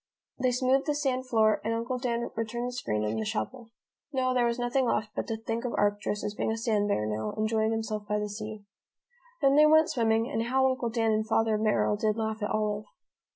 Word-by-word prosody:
They 255 0 +2
smoothed 260 +3 +2
the 295 - +1
sand 260 -3 -1
floor 220 -3 +3
and 225 +1 0
Uncle 240 +2 -2
Dan 235 -2 -2
returned 235 +2 -2
the - - -4
screen 105 - -2
and 110 +1 -1
the - - -1
shovel. 220 - -4 0.4
No, 255 -1 +1
there 245 -1 +3
was 235 0 -1
nothing 245 +1 +1
left 215 -1 0
but - - -3
to 225 -1 -2
think 225 +1 -3
of 245 - -2
Arcturus 205 0 0
as 205 - -2
being 215 - -1
a 225 - -2
sand 220 -3 +1
bear 105 - 0
now, 105 0 -3
enjoying 220 0 +1
himself 220 -2 -3
by 210 - 0
the 210 0 -2
sea. 215 0 -7 0.8
Then 275 0 +5
they 305 0 +8
went 315 +1 +5
swimming, 225 -1 +2
and 225 - -2
how 265 +2 +2
Uncle 255 -2 -2
Dan 225 -1 +1
and 215 0 0
Father 225 0 +2
Merrill 210 -1 +1
did 215 +1 0
laugh 220 -1 -2
at 210 - -1
Olive. 210 -1 -1
225 Hz, 225 wpm, -28 LUFS, 210-245 Hz, 0.8 s, they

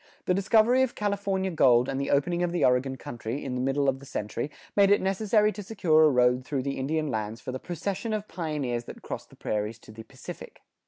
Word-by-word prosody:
The 180 - +2
discovery 220 +6 +4
of 260 -2 0
California 200 -2 -1
gold 125 -6 +4
and 135 0 -2
the 140 - -2
opening 170 +5 +1
of 175 -1 0
the 175 -4 +2
Oregon 125 +1 +2
country, 120 +1 -6
in 130 - -3
the 125 - -2
middle 135 +2 +1
of 135 0 +1
the 140 - -13
century, 105 +6 -3 0.3
made 200 -1 +5
it 205 - +5
necessary 210 +2 +2
to 210 - -7
secure 170 -6 +3
a - - +6
road 125 -1 +3
through 135 -1 -2
the 140 0 -3
Indian 155 +3 -1
lands 110 +1 -3
for - - -6
the 130 - -5
procession 195 - -4
of 215 -1 -2
pioneers 145 -8 -3
that - - -10
crossed - - -6
the - - -17
prairies 105 +1 -3
to 110 - -15
the 110 +1 -10
Pacific. 130 +2 -11
145 Hz, 225 wpm, -27 LUFS, 125-195 Hz, 0.3 s, a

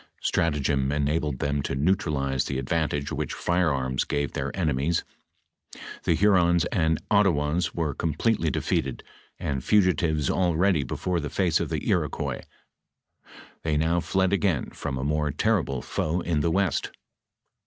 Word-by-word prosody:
Stratagem 70 -4 +1
enabled 75 -1 0
them 70 +1 -1
to 70 - -3
neutralize 70 -4 0
the 70 - -3
advantage 75 +1 -1
which - - -3
firearms 70 -8 0
gave 70 -1 -2
their 70 0 -2
enemies; 80 -1 0 1.0
the - - +3
Hurons 90 -4 +4
and 80 -2 +2
Ottawas 85 -5 +2
were 80 -4 -1
completely 85 - 0
defeated, 65 -3 -1 0.3
and 65 -3 -3
fugitives 85 -7 +2
already 90 -2 +2
before 85 +7 -2
the 75 -2 -4
face 85 +1 +1
of - - -2
the - - -3
Iroquois, - - -1 1.2
they 80 -2 0
now 80 +3 +2
fled 95 +2 +1
again 95 -8 0
from 65 - -4
a 65 - -3
more 75 +1 0
terrible 75 - 0
foe 85 +3 -1
in 85 -3 0
the 85 - +1
west. 95 -2 0
80 Hz, 135 wpm, -26 LUFS, 70-90 Hz, 1.2 s, Hurons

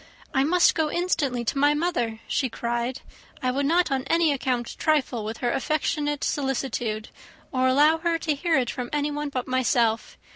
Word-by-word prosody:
"I 265 -2 +3
must 350 +4 +4
go 315 -2 0
instantly 295 -9 0
to 275 - -1
my 290 +1 +4
mother," 245 -9 -1
she 260 - 0
cried. 240 +2 -3 0.4
"I 255 - +2
would 275 +2 0
not 345 0 +2
on 265 -1 0
any 330 -2 +3
account 250 -3 -2
trifle 270 -7 +1
with 220 +2 -5
her 240 - +2
affectionate 295 +1 -1
solicitude, 245 -5 -2 0.4
or 260 -1 +2
allow 295 +5 +4
her 335 0 +1
to 320 -2 -1
hear 320 +2 +1
it 250 -2 0
from 250 -1 -5
anyone 295 0 -1
but 255 -3 -4
myself. 240 -3 +1
275 Hz, 175 wpm, -25 LUFS, 245-305 Hz, 0.4 s, must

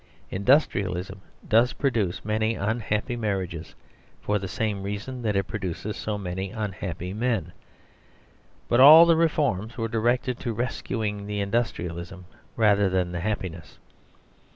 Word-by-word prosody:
Industrialism 100 - +1 0.3
does 115 +3 +4
produce 110 -11 -1
many 110 +1 0
unhappy 110 +3 -1
marriages, 95 -8 -3 0.4
for 105 0 -1
the 95 - -5
same 105 0 -2
reason 105 +6 -5
that 105 -3 -1
it 95 - +2
produces 100 +1 -5
so 105 -1 -3
many 95 0 -4
unhappy 95 -3 -5
men. 110 -6 -1 1.2
But 120 - +2
all 155 +5 +10
the 170 -1 +5
reforms 135 - 0
were 115 -1 -1
directed 120 +3 0
to 120 -3 -3
rescuing 110 -3 -3
the 105 0 -3
industrialism 95 -4 -3 0.3
rather 105 -3 +3
than 90 -1 0
the 85 - -3
happiness. 90 -4 -4
105 Hz, 130 wpm, -25 LUFS, 95-115 Hz, 1.2 s, all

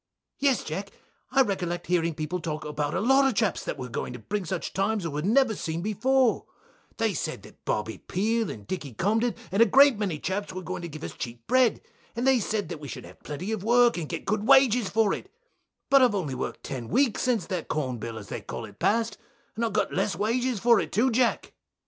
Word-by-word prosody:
Bill. 280 - +4
Yes, 260 - 0
Jack, 195 +6 -5 0.4
I 270 +1 +5
recollect 180 -5 -2
hearing 170 -2 +1
people 155 +3 -3
talk 155 -3 -4
about 150 0 -2
a - - +1
lot 270 +5 +4
of 260 - 0
chaps 215 -5 +1
that - - -3
wur 130 -2 -5
going 125 +1 -4
to - - -6
bring 195 - -3
such 175 +1 -4
times 195 0 0
as 165 - -2
wur 145 +1 -2
never 230 - +3
seen 165 -2 -3
before, 245 +4 +2 0.5
they 225 -2 +1
said 155 - -4
that - - -16
Bobby 110 +1 -2
Peel 225 +4 0
and 105 -2 -8
Dicky 140 - -5
Cobden, 225 - +1 0.2
and 195 +4 +2
a - - +9
great 275 +1 +6
many 190 -7 -1
chaps 190 +6 -3
was 185 0 -6
going 185 -1 -4
to 170 - -5
give 155 +1 -9
us - - -5
cheap 115 -1 -7
bread, 255 -3 +3 0.3
and 235 +2 -1
they 265 -2 +5
said 205 -4 -2
that 170 - -5
we 145 - -8
should - - -7
have - - -15
plenty 150 +8 -5
of 215 -4 -3
work 240 +2 +5
and 165 -4 -4
get 165 - -5
good 215 +1 -1
wages 250 -6 +5
for 220 -2 +2
it, - - -7 0.6
but 275 -1 +7
I've 245 -5 +4
only 160 -9 -2
work'd 130 - -5
ten 130 -4 -5
weeks 250 - +2
since 235 -9 +1
that 180 -2 -4
corn 130 -6 -2
bill 115 +1 -5
as 100 -4 -9
they - - -4
call - - -6
it - - -15
past, 225 -1 +1 0.4
and 230 - -2
I 230 - +2
got 210 - 0
less 205 - 0
wages 235 +2 0
for 235 +1 +5
it - - -3
too, 250 +5 +2
Jack. 240 +1 +1
200 Hz, 235 wpm, -27 LUFS, 160-235 Hz, 0.6 s, a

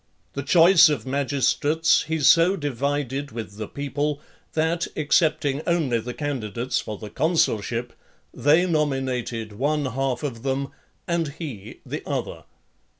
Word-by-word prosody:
The 140 - -3
choice 165 +3 +6
of 150 - -2
magistrates 140 +4 +1
he 160 -1 -1
so 165 +7 +5
divided 140 -2 -2
with 110 -3 -7
the 110 -1 -5
people, 145 +1 -2 0.3
that, 160 +2 0
excepting 150 -2 +1
only 155 -9 +1
the 125 +2 -6
candidates 125 -5 -2
for 105 -1 -6
the 105 -1 -9
consulship, 120 - 0 0.4
they 150 +8 +3
nominated 130 - -1
one 145 +6 0
half 130 +1 -2
of 125 -6 -4
them, 135 +1 -2 0.4
and 170 -2 0
he 110 - -8
the - - -5
other. - - -4
140 Hz, 130 wpm, -24 LUFS, 125-155 Hz, 0.4 s, choice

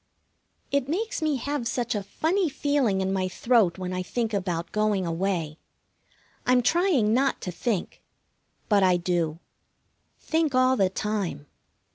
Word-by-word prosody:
It 280 -1 0
makes 415 +4 -2
me 310 -2 +1
have 275 -1 -2
such 240 0 -1
a 205 - -1
funny 325 - 0
feeling 270 -9 +1
in 190 0 0
my 190 -1 0
throat 190 -1 +2
when 185 -1 -4
I 185 - -2
think 225 +4 -2
about 180 -4 -2
going 210 -3 +1
away. 165 -2 -2 0.8
I'm 250 0 +3
trying 290 - +3
not 270 +3 +2
to 180 - -4
think. 195 +2 -3 0.7
But 205 -2 +4
I 185 -2 +4
do. 170 -3 -1 0.8
Think 320 -4 0
all 255 0 +4
the 195 -6 +2
time. 190 -7 -3
210 Hz, 145 wpm, -26 LUFS, 185-265 Hz, 0.8 s, But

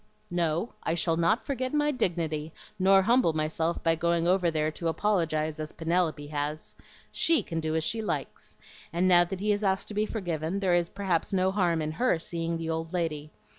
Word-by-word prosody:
"No, 175 +4 0
I 165 - -1
shall 165 -1 +1
not 170 +8 +1
forget 260 0 -2
my 295 0 +2
dignity 165 - -1 0.3
nor 195 +1 +5
humble 235 -5 +3
myself 155 +2 -1
by 165 - +3
going 170 +1 +1
over 180 -1 +3
there 155 -1 0
to 165 +2 -4
apologize 160 -4 0
as 155 0 -5
Penelope 165 -2 0
has. 150 +1 -4 0.4
SHE 330 -1 +3
can 165 - -4
do 160 0 -2
as 160 - +1
she 225 +7 0
likes; 215 - -5 0.3
and 175 +2 +1
now 175 -1 +6
that 185 +1 -6
he 210 +1 +1
has 205 +1 0
asked 190 -1 0
to - - -6
be 210 +1 0
forgiven, 175 -3 -3
there 190 -3 +1
is 175 -1 +2
perhaps 195 -2 -1
no 190 0 +2
harm 175 -5 +1
in 155 - -2
HER 240 +2 +1
seeing 165 0 -3
the 165 0 -5
old 160 +1 -4
lady. 155 -4 -2
170 Hz, 200 wpm, -28 LUFS, 160-195 Hz, 0.4 s, now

